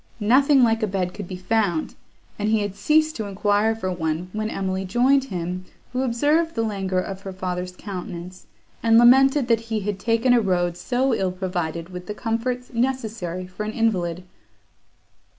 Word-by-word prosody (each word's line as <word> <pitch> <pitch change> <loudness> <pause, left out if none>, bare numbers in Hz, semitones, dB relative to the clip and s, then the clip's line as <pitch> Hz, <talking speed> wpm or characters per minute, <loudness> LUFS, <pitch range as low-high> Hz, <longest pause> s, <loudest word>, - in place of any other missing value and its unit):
Nothing 265 +5 +5
like 225 -1 +3
a 215 - +1
bed 185 -2 -2
could 205 -4 -7
be 185 - -6
found, 185 -3 0 0.5
and 210 +1 0
he 220 -1 +2
had 205 -2 -3
ceased 310 +10 +2
to 220 - -3
enquire 205 +2 +1
for 185 -4 -3
one, 170 +1 -3
when 215 0 -2
Emily 190 -2 -2
joined 255 +8 +3
him, 180 -3 -4 0.3
who 255 - 0
observed 295 +7 +1
the 225 - 0
languor 195 -4 -2
of 190 +1 -5
her 195 - -6
father's 180 -1 -4
countenance, 180 -2 -7 0.3
and 225 0 +5
lamented, 265 +3 +6
that 230 -2 +3
he 220 -2 -1
had 200 -1 -3
taken 230 +3 +2
a 240 - +5
road 175 -3 0
so 250 +7 0
ill 190 -4 0
provided 175 -3 -3
with 180 -1 -8
the 210 - -4
comforts 245 +3 -3
necessary 225 -8 -2
for 185 +3 -9
an 215 +1 -4
invalid. 185 -7 0
205 Hz, 175 wpm, -23 LUFS, 185-235 Hz, 0.5 s, lamented